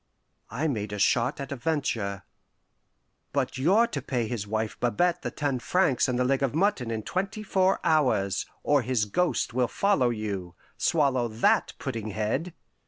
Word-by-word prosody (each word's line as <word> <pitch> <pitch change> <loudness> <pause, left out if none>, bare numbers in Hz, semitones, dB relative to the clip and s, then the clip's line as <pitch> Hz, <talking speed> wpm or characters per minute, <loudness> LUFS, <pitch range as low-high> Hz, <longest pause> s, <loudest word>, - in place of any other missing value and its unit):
I 130 +9 -1
made 105 -7 -2
a - - -3
shot 120 +8 +2
at 140 -1 -6
a - - -2
venture. 120 -9 -2 1.1
"But - - -1
you're 195 - +4
to 145 -11 -4
pay 125 -3 -2
his 110 -3 -4
wife 110 +1 -2
Babette 175 +8 +1
the - - -3
ten 140 -4 -2
francs 140 0 +2
and 125 -1 0
the 125 - +2
leg 135 +1 +1
of 135 0 0
mutton 170 - +1
in 110 -1 -3
twenty 200 - -3
four 190 -2 +2
hours, 130 - +2 0.2
or 145 -1 +3
his 120 -3 0
ghost 175 - 0
will 125 0 +2
follow 195 -10 +2
you. 100 -6 -4 0.2
Swallow 135 -6 +2
that, 110 +1 +2
pudding 115 -5 -4
head! 115 - -2
130 Hz, 170 wpm, -27 LUFS, 110-160 Hz, 1.1 s, you're